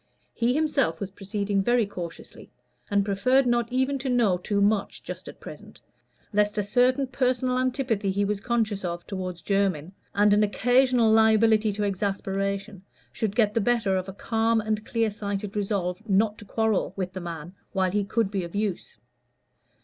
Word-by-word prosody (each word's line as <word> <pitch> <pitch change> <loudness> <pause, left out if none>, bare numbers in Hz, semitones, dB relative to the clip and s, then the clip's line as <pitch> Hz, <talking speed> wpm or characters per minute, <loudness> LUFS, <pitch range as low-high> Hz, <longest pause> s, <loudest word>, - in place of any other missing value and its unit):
He 240 +2 +1
himself 285 - +1
was 195 -1 -5
proceeding 200 0 -2
very 240 +2 +2
cautiously, 175 -4 -9 0.4
and 200 -2 +2
preferred 255 +7 +2
not 240 -1 +1
even 260 +2 0
to 265 0 -3
know 235 -7 +3
too 200 +3 -2
much 200 0 +1
just - - -8
at - - -10
present, - - -11 0.5
lest 210 0 +2
a 210 - +1
certain 250 +6 +2
personal 255 -1 0
antipathy 250 -6 0
he 200 +1 +1
was 205 0 -1
conscious 220 -3 -1
of 175 -1 -4
toward 185 -2 -4
Jermyn, 190 -5 0 0.2
and 205 0 +5
an 210 - +4
occasional 245 +2 +3
liability 220 0 +4
to 210 +1 -2
exasperation, 195 0 -2 0.3
should 215 -3 -3
get 215 -3 +3
the 230 - +1
better 225 -3 +1
of 185 0 -2
a - - -7
calm 225 +2 +1
and 215 0 -2
clear 225 -2 0
sighted 200 0 -4
resolve 195 -2 -1
not 210 +2 +2
to 210 - -11
quarrel 220 -3 0
with 185 -1 -4
the 185 - -5
man 170 0 -7 0.2
while 185 -1 +1
he 205 +1 +1
could 200 0 0
be 195 -3 -1
of 170 +2 -8
use. 205 -3 -3
210 Hz, 170 wpm, -26 LUFS, 195-230 Hz, 0.5 s, and